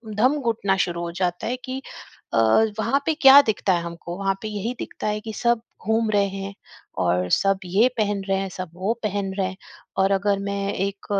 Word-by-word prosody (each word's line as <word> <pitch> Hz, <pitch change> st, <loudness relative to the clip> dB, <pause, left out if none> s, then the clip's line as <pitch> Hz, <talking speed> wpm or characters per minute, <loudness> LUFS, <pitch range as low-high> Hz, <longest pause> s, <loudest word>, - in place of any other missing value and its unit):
दम 255 Hz, +7 st, +3 dB
घुटना 220 Hz, -5 st, +1 dB
शुरू 170 Hz, -1 st, 0 dB
हो 170 Hz, -, -4 dB
जाता 180 Hz, 0 st, -2 dB
है 245 Hz, -, -1 dB
कि 260 Hz, +1 st, -4 dB, 0.5 s
अ, 115 Hz, -, +2 dB, 0.4 s
वहाँ 275 Hz, +5 st, +1 dB
पे 320 Hz, -, +2 dB
क्या 270 Hz, +1 st, +10 dB
दिखता 205 Hz, -6 st, 0 dB
है 170 Hz, -, +1 dB
हमको? 170 Hz, +1 st, -7 dB
वहाँ 195 Hz, 0 st, 0 dB
पे 215 Hz, -, -4 dB
यही 215 Hz, +3 st, -3 dB
दिखता -, -, -5 dB
है 210 Hz, 0 st, 0 dB
कि 220 Hz, 0 st, -7 dB
सब 235 Hz, 0 st, +1 dB, 0.3 s
घूम 220 Hz, 0 st, +2 dB
रहे 200 Hz, -1 st, +3 dB
हैं 195 Hz, +1 st, -6 dB, 0.5 s
और 90 Hz, +1 st, +1 dB
सब 195 Hz, -1 st, +3 dB
ये 200 Hz, +7 st, +4 dB
पहन 205 Hz, -2 st, 0 dB
रहे 195 Hz, -, +2 dB
हैं, 195 Hz, 0 st, -3 dB
सब 185 Hz, -1 st, -6 dB
वो 190 Hz, +6 st, -1 dB
पहन 200 Hz, -2 st, -2 dB
रहे 195 Hz, -2 st, 0 dB
हैं। 185 Hz, 0 st, -7 dB, 0.4 s
और 195 Hz, +1 st, +3 dB
अगर 200 Hz, 0 st, +1 dB
मैं 200 Hz, 0 st, -2 dB
एक 195 Hz, +1 st, -3 dB
200 Hz, 210 wpm, -23 LUFS, 190-220 Hz, 0.5 s, क्या